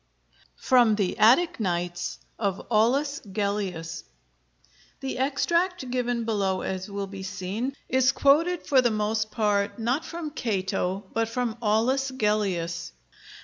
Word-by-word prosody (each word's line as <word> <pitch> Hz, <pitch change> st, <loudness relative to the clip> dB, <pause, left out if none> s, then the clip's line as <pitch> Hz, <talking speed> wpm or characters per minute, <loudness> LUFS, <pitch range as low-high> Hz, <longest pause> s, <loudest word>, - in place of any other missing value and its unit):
FROM 240 Hz, -4 st, +4 dB
THE 200 Hz, -3 st, 0 dB
'ATTIC 245 Hz, +11 st, +5 dB
NIGHTS' 175 Hz, -3 st, -2 dB, 0.2 s
OF 200 Hz, -4 st, -2 dB
AULUS 270 Hz, +7 st, +2 dB
GELLIUS 190 Hz, -5 st, -2 dB, 1.0 s
[The 270 Hz, -2 st, -4 dB
extract 300 Hz, +2 st, 0 dB
given 245 Hz, -2 st, 0 dB
below, 200 Hz, -4 st, 0 dB
as 190 Hz, +1 st, -4 dB
will 200 Hz, 0 st, -3 dB
be 195 Hz, 0 st, -8 dB
seen, 200 Hz, +8 st, -4 dB
is 260 Hz, 0 st, +3 dB
quoted 325 Hz, +7 st, +3 dB
for 265 Hz, -2 st, +4 dB
the 240 Hz, -, +3 dB
most 215 Hz, 0 st, 0 dB
part 205 Hz, -2 st, 0 dB
not 245 Hz, +6 st, 0 dB
from 330 Hz, -3 st, -6 dB
Cato 195 Hz, -6 st, -2 dB
but 225 Hz, 0 st, 0 dB
from 240 Hz, -2 st, -2 dB
Aulus 240 Hz, +5 st, +2 dB
Gellius. 190 Hz, -8 st, -1 dB
220 Hz, 125 wpm, -26 LUFS, 195-260 Hz, 1.0 s, ATTIC